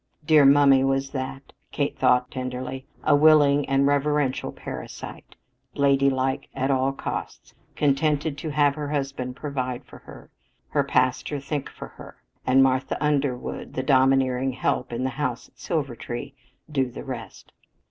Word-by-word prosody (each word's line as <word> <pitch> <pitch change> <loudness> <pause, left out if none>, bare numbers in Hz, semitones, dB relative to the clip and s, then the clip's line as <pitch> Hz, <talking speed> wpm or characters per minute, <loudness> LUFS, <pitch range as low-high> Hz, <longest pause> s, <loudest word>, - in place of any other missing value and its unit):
Dear 150 -2 +6
"mummy" 140 -1 +6
was 135 0 0
that, 135 0 -6 0.2
Kate - - -1
thought 125 0 +2
tenderly 130 0 -5 0.2
a 145 - +4
willing 145 -2 +5
and 135 0 +3
reverential 145 -1 +1
parasite, - - -9 0.4
"ladylike" 135 -1 +1
at 135 +1 0
all 135 0 +2
costs, 135 - -6 0.2
contented 145 +1 +1
to 155 - -4
have 145 -1 +3
her 145 -1 -5
husband 135 -3 -3
provide 130 -4 -4
for - - -14
her, - - -14 0.4
her - - +1
pastor 130 +3 0
think 140 0 -4
for - - -10
her, - - -13 0.3
and 130 +1 +6
Martha 130 0 +1
Underwood, 140 -4 -1
the 130 - -1
domineering 130 -1 +3
"help" 125 0 -1
in 120 +2 -3
the 130 - -1
house 125 -4 -3
at - - -34
Silvertree, 135 -3 -4 0.4
do 135 -3 0
the 120 - -8
rest. 125 -4 -8
135 Hz, 145 wpm, -24 LUFS, 130-145 Hz, 0.4 s, Dear